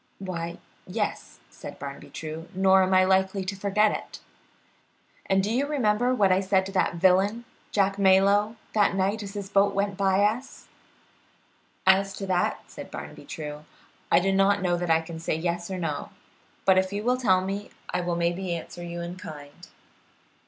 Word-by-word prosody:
"Why, 170 Hz, -3 st, -5 dB, 0.3 s
yes," -, -, -3 dB
said -, -, -10 dB
Barnaby 140 Hz, 0 st, -8 dB
True, 160 Hz, +1 st, -7 dB
"nor 190 Hz, 0 st, +5 dB
am 185 Hz, 0 st, +1 dB
I 185 Hz, 0 st, +5 dB
likely 190 Hz, +1 st, +1 dB
to 195 Hz, +2 st, -3 dB
forget 205 Hz, +2 st, +2 dB
it." -, -, -6 dB, 1.1 s
"And 195 Hz, 0 st, +2 dB
do 210 Hz, +3 st, -1 dB
you 275 Hz, +4 st, +1 dB
remember 245 Hz, -4 st, +1 dB
what 200 Hz, -5 st, +3 dB
I 185 Hz, -, +4 dB
said 190 Hz, -1 st, +1 dB
to 195 Hz, -, -6 dB
that 185 Hz, -2 st, +1 dB
villain, 190 Hz, +6 st, +3 dB, 0.2 s
Jack 195 Hz, -1 st, +1 dB
Malyoe, 200 Hz, +3 st, +4 dB, 0.2 s
that 205 Hz, -2 st, +3 dB
night 195 Hz, +3 st, 0 dB
as 200 Hz, 0 st, -8 dB
his 200 Hz, -1 st, -4 dB
boat 200 Hz, 0 st, +2 dB
went 200 Hz, -1 st, -1 dB
by 195 Hz, 0 st, +3 dB
us?" 225 Hz, +6 st, -2 dB, 1.2 s
"As 195 Hz, +1 st, +4 dB
to 195 Hz, -, -5 dB
that," 185 Hz, -2 st, 0 dB
said -, -, -10 dB
Barnaby -, -, -9 dB
True, 150 Hz, -1 st, -7 dB, 0.5 s
"I -, -, +6 dB
do 195 Hz, +2 st, +1 dB
not 195 Hz, 0 st, +3 dB
know 175 Hz, -1 st, +2 dB
that 175 Hz, 0 st, -3 dB
I 160 Hz, 0 st, +4 dB
can 165 Hz, 0 st, -8 dB
say 165 Hz, -, -1 dB
yes 170 Hz, +2 st, -2 dB
or 190 Hz, -, -3 dB
no, 155 Hz, -5 st, -3 dB, 0.6 s
but 190 Hz, -1 st, +6 dB
if 190 Hz, 0 st, -1 dB
you 205 Hz, +1 st, -3 dB
will 250 Hz, +2 st, +2 dB
tell 190 Hz, -7 st, +3 dB
me, 195 Hz, +2 st, -4 dB, 0.2 s
I 180 Hz, -, +1 dB
will 175 Hz, -1 st, -1 dB
maybe 175 Hz, +1 st, -1 dB
answer 170 Hz, +1 st, -8 dB
you 170 Hz, 0 st, -5 dB
in 175 Hz, +1 st, -6 dB
kind." 145 Hz, -5 st, -11 dB
190 Hz, 180 wpm, -26 LUFS, 175-200 Hz, 1.2 s, I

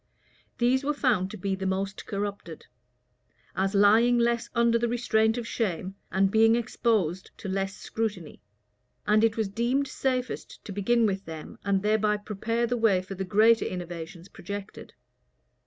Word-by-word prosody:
[*] -, -, -36 dB
These 250 Hz, +3 st, +2 dB
were 295 Hz, +1 st, 0 dB
found 220 Hz, -10 st, +1 dB
to 215 Hz, -, -8 dB
be 195 Hz, +1 st, -2 dB
the 190 Hz, 0 st, -3 dB
most 190 Hz, +1 st, -3 dB
corrupted, 200 Hz, -5 st, -5 dB, 0.9 s
as 190 Hz, +2 st, 0 dB
lying 220 Hz, +5 st, +5 dB
less 235 Hz, 0 st, +1 dB
under 235 Hz, 0 st, +3 dB
the 235 Hz, -, +1 dB
restraint 225 Hz, -1 st, +1 dB
of 235 Hz, -1 st, -4 dB
shame, 190 Hz, -5 st, -2 dB, 0.2 s
and 190 Hz, +1 st, +2 dB
being 225 Hz, +1 st, +5 dB
exposed 220 Hz, -7 st, 0 dB
to -, -, -7 dB
less 195 Hz, +1 st, -2 dB
scrutiny;[] 210 Hz, -8 st, -4 dB, 0.6 s
and 215 Hz, +1 st, +3 dB
it 225 Hz, 0 st, +2 dB
was 220 Hz, -2 st, 0 dB
deemed 240 Hz, +7 st, 0 dB
safest 255 Hz, -2 st, -3 dB
to -, -, -7 dB
begin 230 Hz, +4 st, +2 dB
with 195 Hz, -1 st, -1 dB
them, 160 Hz, -1 st, -9 dB
and 200 Hz, -1 st, +1 dB
thereby 210 Hz, 0 st, +2 dB
prepare 220 Hz, +3 st, -2 dB
the 245 Hz, +1 st, -1 dB
way 205 Hz, -5 st, +3 dB
for 185 Hz, -, -7 dB
the 190 Hz, 0 st, -4 dB
greater 220 Hz, +4 st, +4 dB
innovations 175 Hz, -1 st, -6 dB
projected. 200 Hz, +1 st, -8 dB
210 Hz, 160 wpm, -27 LUFS, 190-235 Hz, 0.9 s, lying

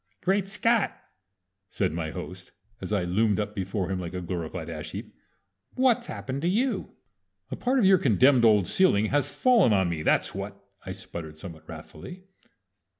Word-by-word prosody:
"Great 195 Hz, +1 st, +1 dB
Scott!" 215 Hz, +2 st, +1 dB, 0.7 s
said -, -, -1 dB
my 80 Hz, -1 st, -3 dB
host, 90 Hz, +1 st, -8 dB, 0.3 s
as -, -, -6 dB
I 100 Hz, -4 st, +1 dB
loomed 105 Hz, +3 st, +1 dB
up 105 Hz, 0 st, -3 dB
before 95 Hz, -1 st, -3 dB
him 95 Hz, -, -2 dB
like 90 Hz, 0 st, -6 dB
a -, -, -2 dB
glorified 85 Hz, -1 st, -5 dB
ash 80 Hz, -2 st, -7 dB
heap. -, -, -7 dB, 0.6 s
"What's 250 Hz, -2 st, +2 dB
happened 135 Hz, +1 st, -5 dB
to 170 Hz, -, 0 dB
you?" 240 Hz, +8 st, -1 dB, 0.6 s
"A -, -, -2 dB
part 255 Hz, +2 st, 0 dB
of 235 Hz, -, +3 dB
your 190 Hz, -1 st, +6 dB
condemned 130 Hz, -, +4 dB
old 105 Hz, -4 st, +5 dB
ceiling 145 Hz, -, +3 dB
has 145 Hz, 0 st, +1 dB
fallen 180 Hz, -, +4 dB
on 95 Hz, -3 st, +2 dB
me, 80 Hz, -2 st, -3 dB
that's -, -, +1 dB
what!" -, -, -6 dB, 0.2 s
I -, -, -6 dB
sputtered 80 Hz, -2 st, -8 dB
somewhat 80 Hz, -1 st, -11 dB
wrathfully. 185 Hz, +1 st, -10 dB
105 Hz, 170 wpm, -26 LUFS, -, 0.7 s, your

